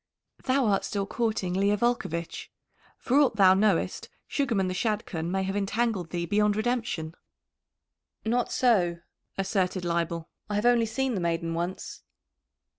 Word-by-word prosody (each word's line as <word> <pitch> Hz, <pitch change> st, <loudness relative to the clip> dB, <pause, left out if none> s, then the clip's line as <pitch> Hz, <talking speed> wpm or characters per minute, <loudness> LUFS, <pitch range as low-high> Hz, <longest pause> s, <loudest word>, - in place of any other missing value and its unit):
"Thou 260 Hz, 0 st, +2 dB
art 200 Hz, -3 st, +2 dB
still 200 Hz, -1 st, -2 dB
courting 215 Hz, -5 st, -1 dB
Leah 200 Hz, +2 st, +2 dB
Volcovitch. 195 Hz, -8 st, -2 dB, 0.5 s
For 265 Hz, +3 st, +2 dB
aught 280 Hz, -6 st, +3 dB
thou 190 Hz, -3 st, +7 dB
knowest, 195 Hz, -2 st, +1 dB, 0.2 s
Sugarman 225 Hz, -10 st, 0 dB
the 185 Hz, -, -2 dB
Shadchan 185 Hz, -5 st, -2 dB
may 190 Hz, +1 st, 0 dB
have 195 Hz, +1 st, -2 dB
entangled 205 Hz, -2 st, -1 dB
thee 170 Hz, +1 st, -2 dB
beyond 210 Hz, +3 st, +2 dB
redemption." 220 Hz, -8 st, -2 dB, 1.1 s
"Not 240 Hz, +2 st, 0 dB
so," 180 Hz, -9 st, +2 dB, 0.4 s
asserted 190 Hz, -2 st, 0 dB
Leibel. 170 Hz, -1 st, -1 dB, 0.2 s
"I 205 Hz, -, -1 dB
have 210 Hz, +3 st, 0 dB
only 240 Hz, -2 st, +4 dB
seen 265 Hz, +3 st, -1 dB
the 195 Hz, -, -2 dB
maiden 165 Hz, -1 st, -1 dB
once." 175 Hz, +3 st, -4 dB
200 Hz, 140 wpm, -27 LUFS, 175-230 Hz, 1.1 s, thou